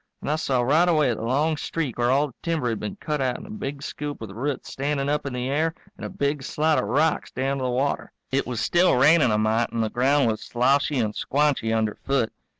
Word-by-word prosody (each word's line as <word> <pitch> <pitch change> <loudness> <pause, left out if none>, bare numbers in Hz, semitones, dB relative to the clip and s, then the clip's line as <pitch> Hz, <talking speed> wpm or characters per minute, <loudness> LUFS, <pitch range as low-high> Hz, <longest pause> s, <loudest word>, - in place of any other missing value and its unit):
And - - -2
I - - +2
saw 130 -5 0
right 160 +8 +3
away 150 -7 +3
the 110 - -6
long 145 +7 +1
streak 145 -6 -3
where 120 0 +2
all 140 +3 +3
the - - -17
timber 160 -7 -1
had 115 - -2
been 200 - -5
cut 150 -7 -3
out 130 -2 0
in - - -10
a 210 - -10
big 145 -9 -5
scoop 145 0 -5
with 110 -3 -7
roots 130 +6 -4
standing 140 0 -1
up 145 -1 -1
in 135 - -4
the 125 0 -2
air 160 +4 0 0.2
and - - -12
a - - -4
big 140 0 -1
slide 155 +3 +1
of - - -1
rocks 155 +3 +1
down 135 +2 -2
to 130 - -2
the - - 0
water. 130 +3 -1 0.2
It 135 +1 0
was 120 -3 -3
still 175 +1 +3
raining 145 +2 +5
a 105 - +2
mite 110 +2 +1
and 115 - -1
the 110 - -2
ground 135 +2 +3
was 110 -1 -1
sloshy 135 +4 +1
and 110 -3 0
squanchy 140 -5 0
under 110 -1 +1
foot. 135 -5 -1
140 Hz, 250 wpm, -24 LUFS, 125-150 Hz, 0.2 s, raining